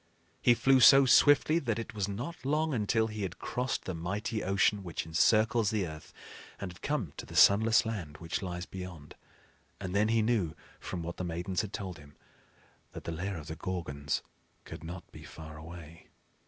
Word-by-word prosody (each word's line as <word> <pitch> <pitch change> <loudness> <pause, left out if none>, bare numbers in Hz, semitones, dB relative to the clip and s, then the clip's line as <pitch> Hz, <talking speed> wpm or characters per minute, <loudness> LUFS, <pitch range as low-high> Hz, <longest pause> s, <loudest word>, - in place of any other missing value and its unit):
He 120 - +5
flew 135 +3 +4
so 135 +2 +8
swiftly 145 +5 +5
that 115 -8 -2
it 115 - -5
was 100 -2 -1
not 120 - -6
long 155 +3 +1
until 110 -1 +1
he 110 -1 -5
had 95 -2 -4
crossed 125 +2 -3
the 95 - -3
mighty 100 +6 -3
ocean 100 +2 +2
which 85 -3 -4
encircles 110 +6 +3
the 105 -4 0
earth, 80 -2 -9 0.5
and 95 -3 -5
had 90 - -18
come 120 - -2
to - - -6
the - - -10
sunless 110 +3 +6
land 90 -10 -5
which 80 -1 -4
lies 90 -1 -4
beyond; 90 -6 -9 0.7
and 95 -2 -5
then 105 +1 +3
he 115 0 +2
knew, 105 -9 0 0.2
from 85 -2 -5
what 85 +1 -6
the - - -3
Maidens 90 +2 -2
had 105 -3 -6
told 95 -5 -6
him, 75 0 -16 0.8
that - - -8
the - - -4
lair 90 +3 -3
of 75 - -8
the 80 - -6
Gorgons 75 -5 -3 0.4
could - - -9
not 85 +2 -7
be - - -12
far 80 -1 -10
away. 80 +1 -11
95 Hz, 190 wpm, -31 LUFS, 85-115 Hz, 0.8 s, so